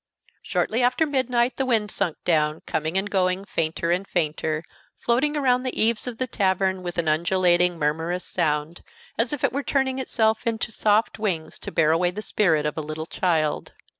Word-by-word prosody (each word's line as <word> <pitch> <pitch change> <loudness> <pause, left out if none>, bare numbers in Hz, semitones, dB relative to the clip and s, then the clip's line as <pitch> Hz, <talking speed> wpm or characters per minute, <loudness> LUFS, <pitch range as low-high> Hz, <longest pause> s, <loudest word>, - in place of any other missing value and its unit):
Shortly 230 +3 0
after 250 +6 +3
midnight 255 -4 0
the 270 - 0
wind 220 -4 +1
sunk 180 -6 -1
down, 155 -2 +1
coming 160 +4 -1
and 195 +1 0
going 190 -1 0
fainter 165 -2 -1
and 185 +3 0
fainter, 155 -1 -1 0.3
floating 280 +6 +1
around 255 -3 +2
the 255 -1 -3
eaves 225 +2 +2
of 240 -2 -4
the 255 - 0
tavern 190 -4 0
with 175 -1 -6
an 170 - 0
undulating, 175 +2 +2
murmurous 160 +4 -1
sound, 155 -1 -1 0.3
as 230 +1 0
if 295 - -4
it - - +2
were 280 - -1
turning 265 -1 0
itself 220 -3 0
into 230 0 -1
soft 215 +1 +1
wings 180 -7 -3
to - - -7
bear 155 -1 +3
away 175 +2 +2
the 205 +4 -6
spirit 160 -10 +2
of 150 - -2
a - - -1
little 155 +1 -5
child. 160 -4 -1
190 Hz, 185 wpm, -24 LUFS, 165-235 Hz, 0.3 s, after